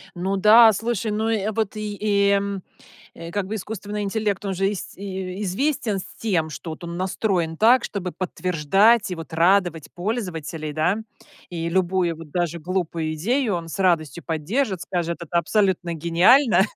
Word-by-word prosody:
Ну 190 +3 -1
да, 220 +3 +8
слушай, 225 +1 -2
ну, 215 +1 -1
э, 215 -1 0
вот 220 -1 -2
и 210 -1 -5
и, 200 -1 +3 0.8
э, 165 0 -8
как 200 0 -2
бы 215 - -3
искусственный 210 0 -5
интеллект, 205 -1 -2
он 195 - -1
же 195 +2 0
ис 205 - -6
известен 195 +5 -2
с - - -7
тем, 175 -8 0
что 155 +3 -7
он 170 0 -6
настроен 185 -3 -1
так, 235 +5 +5
чтобы 185 -3 -4
подтверждать 185 +5 +2
и, 180 - -3
вот, 165 -1 -9
радовать 170 -1 +2
пользователей, 175 -7 -4
да. 160 +7 +1 0.5
И 165 -1 -4
любую, 180 -1 +1
вот, 160 -1 -11
даже 175 -1 -1
глупую 165 -2 -2
идею 225 - 0
он 165 -1 -5
с 180 - -6
радостью 170 -3 +1
поддержит, 185 - -1
скажет: 170 -2 -2
"Это 170 +1 -1
абсолютно 185 -2 +1
гениально". 175 - +4
185 Hz, 160 wpm, -23 LUFS, 170-210 Hz, 0.8 s, да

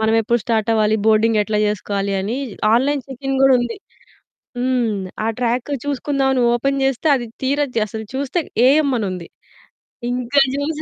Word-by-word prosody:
మనమెప్పుడు 225 +1 +2
start 225 -2 0
అవ్వాలి? 215 -1 +2
Boarding 220 0 +3
ఎట్లా 210 0 -1
జేసుకోవాలి? 200 -1 -2
అని 215 +6 -3 0.4
ఆన్‌లైన్ 275 +3 +1
చెకింగ్ 270 +1 -3
గూడా 270 -1 +6
ఉంది. 240 -1 -3 0.8
హ్మ్. 250 -1 +1 0.4
ఆ - - 0
ట్రాక్ 245 +3 -1
చూసుకుందాం 275 -1 -1
అని 250 - +1
ఓపెన్ 275 +3 0
జేస్తే. 270 +3 0
అది 240 -2 -4 0.2
తీరా 285 +2 +1 0.2
అసలు 220 +2 -6
చూస్తే 280 +5 -1 0.3
ఏఎం 290 +1 +3
అని 210 - -2
ఉంది. 175 -2 -7 0.8
ఇంకా 250 +3 +2
జూస్ 295 +2 -2
245 Hz, 150 wpm, -19 LUFS, 220-275 Hz, 0.8 s, గూడా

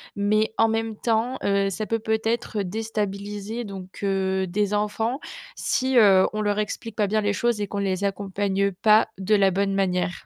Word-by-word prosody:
mais 215 +2 +1
en 225 0 +4
même 225 0 -1
temps, 235 +3 0
heu, 200 0 +2
ça 215 +3 -3
peut 225 +1 -1
peut-être 220 0 -1
déstabiliser 210 +2 -4
donc, 190 -3 -9
heu, 190 -1 0
des 205 +3 -1
enfants 220 +5 -1 0.4
si, 260 -1 0
heu, 195 -4 +6
on 215 - -2
leur 205 -1 0
explique 215 +1 -4
pas 210 -2 +1
bien 215 +2 +1
les 205 -1 0
choses 235 +1 0
et 205 - -1
qu'on 200 - -5
les 195 -1 -1
accompagne 200 0 -1
pas 210 +4 +4
de 200 +3 +2
la 195 -2 +4
bonne 195 +1 0
manière. 180 -2 -1
205 Hz, 180 wpm, -24 LUFS, 195-220 Hz, 0.4 s, heu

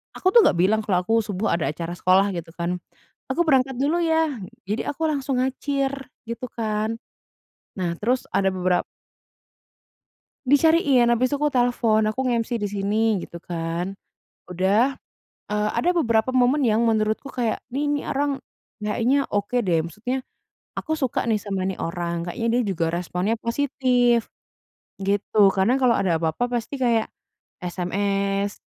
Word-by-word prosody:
aku - - -2
tuh 470 - +9
nggak - - +3
bilang 200 +5 +3
kalau 185 -3 +1
aku 225 - 0
subuh 205 +1 -2
ada 170 - 0
acara 165 +2 -5
sekolah 190 +3 +3
gitu 170 -1 -6
kan, 175 +1 -2 0.5
"Aku 325 +6 +2
berangkat 265 -3 +3
dulu 290 +6 +1
ya." 320 -5 +1 0.3
Jadi 210 +3 -1
aku 320 +3 -2
langsung 275 -2 -1
ngacir 270 +1 -1 0.3
gitu 235 +2 -5
kan, 220 0 -2 0.8
nah 180 -3 -1
terus 245 +4 +1
ada 195 - +3
bebera 180 -1 +1 1.6
Dicariin. 285 -3 +4
Habis 250 +3 +2
itu - - +1
aku 295 - +3
telepon 240 -4 +2
aku 215 +3 -2
nge-MC 235 -1 -1
di 205 - 0
sini 205 +2 +1
gitu 170 0 -11
kan. 170 +3 -4 0.5
Udah, 200 +9 +2 0.5
eee, 210 0 0
ada 350 - +1
beberapa 235 -5 +2
momen 255 +2 +3
yang 220 +1 +3
menurutku 220 +3 0
kayak, 235 -3 -2
ni 285 +4 -1
ni 290 0 0
orang 280 -1 -1 0.4
kayaknya 235 +6 +1
oke 205 +4 -1
deh 175 -4 +2
maksudnya 210 +11 -4 0.6
aku 315 -1 -2
suka 265 -5 0
nih 215 - +2
sama 200 -2 -3
ni 190 0 -2
orang. 170 0 -3
Kayaknya 230 +6 -2
dia - - +2
juga 165 - 0
responnya 180 +5 -1
positif 245 -1 +1 0.7
gitu. 200 0 +2
Karena 195 +7 +2
kalau 255 -3 +3
ada 185 -7 +1
apa-apa 165 +9 -1
pasti 250 +4 -4
kayak 235 -3 +1 0.5
SMS 195 +2 -1
220 Hz, 150 wpm, -23 LUFS, 190-255 Hz, 1.6 s, tuh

